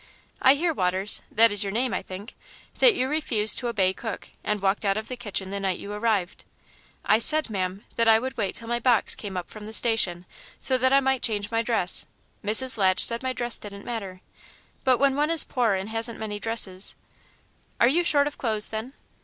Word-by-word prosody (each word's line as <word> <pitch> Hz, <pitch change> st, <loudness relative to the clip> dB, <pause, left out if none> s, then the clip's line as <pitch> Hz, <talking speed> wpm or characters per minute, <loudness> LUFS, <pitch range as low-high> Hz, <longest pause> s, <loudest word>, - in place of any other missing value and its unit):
"I 265 Hz, +2 st, +5 dB
hear, 330 Hz, +3 st, -1 dB
Waters 190 Hz, -2 st, +1 dB
that 230 Hz, 0 st, +4 dB
is 205 Hz, 0 st, 0 dB
your 200 Hz, -, -4 dB
name, 240 Hz, +4 st, -1 dB
I -, -, -2 dB
think 195 Hz, +5 st, -10 dB, 0.5 s
that 480 Hz, -4 st, +5 dB
you 260 Hz, -, -1 dB
refused 255 Hz, -8 st, +2 dB
to 245 Hz, -, -4 dB
obey 195 Hz, -5 st, 0 dB
cook, 225 Hz, +2 st, -7 dB
and 210 Hz, 0 st, -2 dB
walked 195 Hz, +2 st, -1 dB
out 200 Hz, 0 st, 0 dB
of 220 Hz, +1 st, -6 dB
the 255 Hz, -, -5 dB
kitchen 195 Hz, -5 st, -4 dB
the 200 Hz, -, -4 dB
night 190 Hz, -2 st, -2 dB
you 205 Hz, -, -8 dB
arrived." 210 Hz, -4 st, -2 dB, 0.6 s
"I 215 Hz, -, +3 dB
said, 305 Hz, +1 st, +4 dB
ma'am, 190 Hz, 0 st, -4 dB
that 230 Hz, 0 st, +1 dB
I 220 Hz, 0 st, +6 dB
would 260 Hz, +3 st, -5 dB
wait 200 Hz, -5 st, -3 dB
till 230 Hz, -, -10 dB
my 240 Hz, 0 st, -2 dB
box 240 Hz, -2 st, +2 dB
came 195 Hz, -3 st, -7 dB
up 180 Hz, -, -5 dB
from 215 Hz, -1 st, -10 dB
the 220 Hz, -, -9 dB
station, 195 Hz, -7 st, +1 dB, 0.3 s
so 260 Hz, -, +2 dB
that 260 Hz, +1 st, +1 dB
I 275 Hz, 0 st, +4 dB
might 265 Hz, -2 st, 0 dB
change 210 Hz, -2 st, -2 dB
my 225 Hz, 0 st, 0 dB
dress. 225 Hz, -6 st, +2 dB, 0.4 s
Mrs. 225 Hz, +4 st, +3 dB
Latch 185 Hz, -1 st, +4 dB
said 235 Hz, 0 st, +3 dB
my 260 Hz, 0 st, -2 dB
dress 240 Hz, -1 st, 0 dB
didn't 200 Hz, -1 st, -10 dB
matter, 195 Hz, -6 st, -6 dB, 0.6 s
but 255 Hz, -2 st, +3 dB
when 275 Hz, 0 st, +1 dB
one 295 Hz, +2 st, 0 dB
is 330 Hz, -2 st, +4 dB
poor 235 Hz, -6 st, 0 dB
and 190 Hz, +2 st, -5 dB
hasn't 225 Hz, +1 st, -2 dB
many 210 Hz, -1 st, -6 dB
dresses 210 Hz, -4 st, -1 dB, 0.4 s
" -, -, -39 dB
"Are 235 Hz, -, +5 dB
you 330 Hz, +7 st, +1 dB
short 290 Hz, -4 st, +3 dB
of 290 Hz, -, -6 dB
clothes, 215 Hz, -4 st, +3 dB
then?" 220 Hz, +4 st, -6 dB
225 Hz, 220 wpm, -24 LUFS, 200-255 Hz, 0.6 s, I